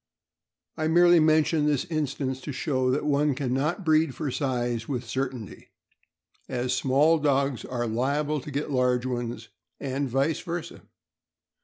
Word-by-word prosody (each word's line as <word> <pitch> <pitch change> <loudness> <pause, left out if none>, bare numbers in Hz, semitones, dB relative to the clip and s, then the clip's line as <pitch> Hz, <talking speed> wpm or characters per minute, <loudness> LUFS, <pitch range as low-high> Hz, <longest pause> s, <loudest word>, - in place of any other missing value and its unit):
I 155 - 0
merely 175 +1 +6
mention 155 -1 +3
this 145 -1 +1
instance 140 -5 -2
to 145 - -5
show 130 -2 0
that 140 +3 0
one 145 -1 +2
can 130 -3 -2
not 155 +8 -1
breed 155 -3 +3
for 150 -4 -3
size 120 -4 -2
with 125 -3 -3
certainty, 125 -3 -5 0.8
as 125 0 -1
small 145 +6 +3
dogs 140 -3 +1
are 120 -2 -3
liable 140 +6 -1
to 150 - -9
get 145 +1 -3
large 125 -1 +1
ones, 120 -2 -4 0.3
and 135 0 -2
vice 135 +5 +1
versa. 175 -1 -6
140 Hz, 145 wpm, -26 LUFS, 125-150 Hz, 0.8 s, merely